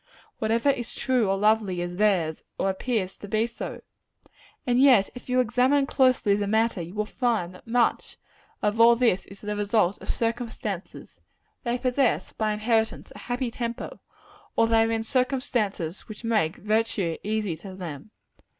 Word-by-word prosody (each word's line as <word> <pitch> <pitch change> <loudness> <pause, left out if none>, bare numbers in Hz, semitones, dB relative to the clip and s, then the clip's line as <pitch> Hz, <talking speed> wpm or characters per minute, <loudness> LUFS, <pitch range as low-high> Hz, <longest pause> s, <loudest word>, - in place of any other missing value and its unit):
Whatever 230 +5 +2
is 240 -4 -5
true 250 -6 +1
or 195 - +1
lovely, 210 -3 +2
is 175 0 -4
theirs; 185 -7 +1 0.2
or 195 - +1
appears 190 -1 -2
to 205 - -9
be 215 +3 +1
so. 235 0 -7 0.8
And 245 0 +2
yet, 250 -8 +6
if 245 +1 -11
you 250 0 +2
examine 255 +4 +3
closely 255 -7 +3
the 205 0 -1
matter, 220 -2 +1
you 170 +4 -8
will 210 0 0
find 220 -6 -1
that 180 - -16
much 235 0 +1 0.5
of 210 +2 +1
all 235 +1 +8
this 230 -6 +1
is 195 0 -13
the 210 0 -3
result 205 -2 +1
of - - -9
circumstances. 225 -5 -4 0.4
They 240 -1 0
possess, 255 0 0
by 215 -1 0
inheritance, 220 +1 0
a - - -9
happy 245 0 -3
temper 235 0 -5 0.6
or 230 - +4
they 225 0 +4
are 225 - -1
in 225 0 0
circumstances 240 - -1
which 215 +1 -10
make 215 -8 +1
virtue 210 -5 0
easy 210 -4 -1
to 190 +3 -10
them. 165 -2 -7
220 Hz, 165 wpm, -26 LUFS, 200-240 Hz, 0.8 s, all